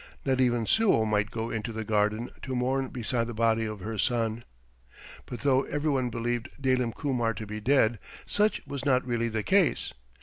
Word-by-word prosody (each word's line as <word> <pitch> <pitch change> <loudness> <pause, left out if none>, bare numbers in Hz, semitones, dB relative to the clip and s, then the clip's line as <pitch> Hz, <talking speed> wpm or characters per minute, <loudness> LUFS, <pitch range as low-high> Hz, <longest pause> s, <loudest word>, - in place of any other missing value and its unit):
Not 130 -1 +2
even 120 -2 +2
Suo 195 - +3
might 105 -1 +1
go 115 0 -4
into 110 +1 -3
the 110 0 -4
garden 105 +2 0
to 130 - -4
mourn 130 +2 0
beside 120 -1 -2
the 120 - -6
body 115 0 +2
of 110 -2 -5
her 110 +2 -4
son. 115 -2 0 0.8
But 120 - -6
though 135 -2 +3
every 150 +1 -1
one 130 -3 +1
believed 120 +1 -2
Dalim 130 -3 +1
Kumar 120 -6 0
to 110 - -6
be 105 +1 -5
dead, 120 -2 +3 0.3
such 210 +1 +1
was 140 -2 -5
not 130 -3 +2
really 120 -2 0
the 110 -1 -2
case. 190 -5 +2
120 Hz, 190 wpm, -28 LUFS, 110-130 Hz, 0.8 s, Suo